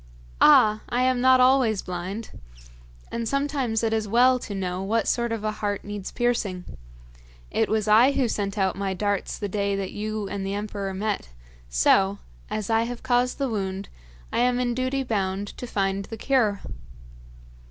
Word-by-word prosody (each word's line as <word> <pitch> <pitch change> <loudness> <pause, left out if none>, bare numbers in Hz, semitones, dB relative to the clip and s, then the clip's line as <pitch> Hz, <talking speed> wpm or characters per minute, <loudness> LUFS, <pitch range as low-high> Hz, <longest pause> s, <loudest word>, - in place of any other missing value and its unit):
'Ah! 215 0 +6
I 245 +1 +1
am 255 -1 +2
not 260 0 +6
always 255 -5 +4
blind. 185 +5 -5 0.8
And 230 -1 -2
sometimes 275 -5 0
it 225 -1 +1
is 220 -1 0
well 250 +4 +4
to 205 - -6
know 185 -1 -3
what 220 +4 0
sort 235 -1 0
of 225 -2 -3
a 215 - 0
heart 205 -1 -3
needs 205 -2 -6
piercing. 220 -7 -1 0.9
It - - +1
was 215 -1 0
I 230 +6 +6
who 265 -3 +1
sent 205 -2 -2
out 190 -1 +1
my 195 0 -2
darts 205 0 -1
the 205 - -3
day 200 0 -1
that 195 -1 -3
you 215 0 -4
and 200 0 -4
the 195 +1 -2
emperor 205 -1 -4
met, 205 - -2 0.4
so, 190 - +3 0.3
as 215 -2 -3
I 225 0 +2
have 240 0 -6
caused 250 -1 +1
the 275 - 0
wound, 195 -3 -3 0.4
I - - +1
am 245 0 +2
in 245 -1 0
duty 255 +2 -1
bound 200 -4 -2
to 245 - -5
find 195 -2 -1
the 225 - -8
cure!' 220 -5 +1
215 Hz, 175 wpm, -25 LUFS, 195-245 Hz, 0.9 s, Ah